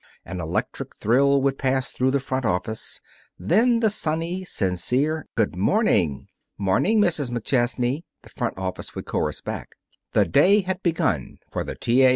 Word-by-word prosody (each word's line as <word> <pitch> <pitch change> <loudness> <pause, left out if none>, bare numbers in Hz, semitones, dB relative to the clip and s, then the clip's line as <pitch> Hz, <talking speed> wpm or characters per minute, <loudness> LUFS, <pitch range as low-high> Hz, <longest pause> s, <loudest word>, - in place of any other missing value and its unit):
An 90 +1 -6
electric 80 +1 -3
thrill 140 +5 +3
would 135 -1 +1
pass 130 -1 0
through 130 +1 +1
the 140 +1 +2
front 130 0 -2
office. 110 +1 -2 0.4
Then 230 +6 +3
the 220 -2 +4
sunny, 170 0 -1
sincere, 130 - 0
"Good 110 -5 +1
morning!" 95 - +2 0.3
"'Morning, 105 - +2
Mrs. 160 -10 +1
McChesney!" 120 +3 0 0.2
the - - -15
front - - -3
office 95 -1 -5
would - - -5
chorus - - -2
back. - - -6 0.4
The - - +4
day 185 +9 +5
had 190 0 -3
begun 135 - 0
for - - -2
the - - -6
T. 120 +3 +2
A. 130 - +7
135 Hz, 160 wpm, -24 LUFS, 110-170 Hz, 0.4 s, A